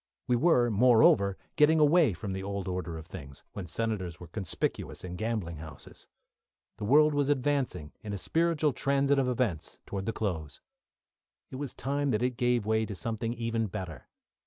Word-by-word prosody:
We 125 - +3
were, 120 -4 +4
moreover, 105 -4 +5 0.2
getting 155 +1 +5
away 150 - +5
from 95 +2 -5
the 95 - -4
old 100 -1 -4
order 90 -3 -3
of 80 - -9
things, 75 -7 -10
when 95 -3 -6
senators 95 -6 -3
were 90 - -9
conspicuous 100 -6 -3
in 90 -1 -6
gambling 105 -6 -3
houses. 80 -2 -11 0.7
The 105 - -3
world 150 +6 +5
was 145 -1 +1
advancing 135 - 0
in 105 - -6
a 100 - -2
spiritual 160 - +1
transit 140 +2 +2
of 130 -2 +1
events 115 -11 -2
towards 95 0 -5
the - - +1
close. 80 - -3 0.9
It 130 - -6
was 145 -2 -5
time 140 +2 -1
that 110 -1 +1
it 125 0 0
gave 120 -2 +1
way 110 0 +2
to 100 - -5
something 115 +2 -3
even 115 -1 -1
better. 90 -4 -7
115 Hz, 175 wpm, -29 LUFS, 95-135 Hz, 0.9 s, moreover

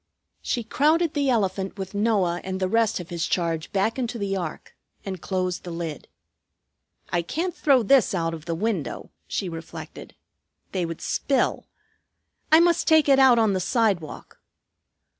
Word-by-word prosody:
She 240 - -2
crowded 310 +7 +2
the 285 -2 +1
elephant 195 -4 0
with 190 0 -6
Noah 200 -5 +1
and 190 0 -4
the 185 - 0
rest 225 +1 +1
of 175 -1 -9
his 170 -2 -2
charge 165 -2 -1
back 205 +6 0
into 240 -1 -2
the 200 -2 -2
ark 175 -5 -6 0.3
and 190 -3 -5
closed 185 -2 -2
the 180 - -7
lid. 165 -4 -5 1.0
"I 175 - +1
can't 335 - -3
throw 270 -5 +3
this 250 -2 +4
out 165 -2 -1
of 160 -1 -8
the 165 -1 -2
window," 200 -3 -3 0.2
she 195 - -2
reflected. 165 -1 -9 0.6
"They 180 -3 -1
would 165 -1 -7
spill. 275 -2 0 0.8
I 315 - +8
must 340 -1 +3
take 315 -2 +5
it 275 -1 +5
out 260 -3 +6
on 220 -3 +3
the 190 - 0
sidewalk. 195 - -1
195 Hz, 160 wpm, -24 LUFS, 175-245 Hz, 1.0 s, I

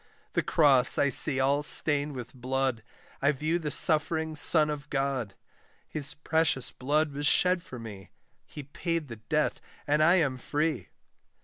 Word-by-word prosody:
The - - +1
cross 135 -6 +4
I 140 - +2
see 135 +1 +2
all 140 +2 +1
stained 145 -1 0
with 125 -2 -9
blood, 130 -1 -3 0.4
I 140 +1 +3
view 155 +4 -2
the 155 -3 -4
suffering 160 +1 +1
Son 150 0 +5
of 150 0 -8
God; 135 -7 -3 0.5
His 145 -2 -3
precious 155 -3 -1
blood 150 +4 -1
was 145 +1 -2
shed 180 +2 +3
for 130 -7 -11
me, 105 -5 -11 0.4
He 150 - -10
paid 160 +2 -4
the 115 - -8
debt, 150 +8 -2 0.2
and 150 +1 +1
I 170 +4 +4
am 135 -8 0
free! 150 +4 -3
145 Hz, 155 wpm, -27 LUFS, 130-155 Hz, 0.5 s, Son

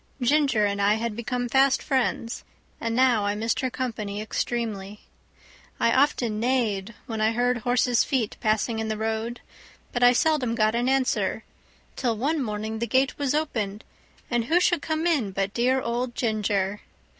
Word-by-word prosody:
Ginger 270 -4 +3
and 200 0 -1
I 205 +1 +4
had 225 -1 -3
become 245 +2 -2
fast 265 +2 +3
friends, 240 -4 -1 0.4
and 230 0 -2
now 250 -4 +4
I 205 0 0
missed 225 +2 -1
her 260 - 0
company 220 -5 -4
extremely. 215 -2 -3 0.8
I 230 - +3
often 245 -5 +2
neighed 230 -4 0
when 225 -2 -4
I 220 +1 +2
heard 245 +1 +1
horses' 245 0 +2
feet 245 -6 -1
passing 220 +1 0
in 220 - -2
the 215 -1 -2
road, 220 +2 -3 0.5
but 245 - -1
I 245 0 +7
seldom 255 -4 +1
got 215 -1 +2
an 240 +2 +1
answer; 265 -1 0 0.5
till 235 -4 -1
one 290 +6 0
morning 220 -1 -3
the 235 - -1
gate 265 +3 +1
was 285 0 0
opened, 220 -9 -2 0.4
and 240 -2 0
who 335 +8 +3
should 350 -3 +2
come 315 +2 -2
in 275 - +1
but 195 +1 -1
dear 255 +3 +2
old 240 0 -2
Ginger. 210 -3 -1
235 Hz, 165 wpm, -25 LUFS, 215-255 Hz, 0.8 s, I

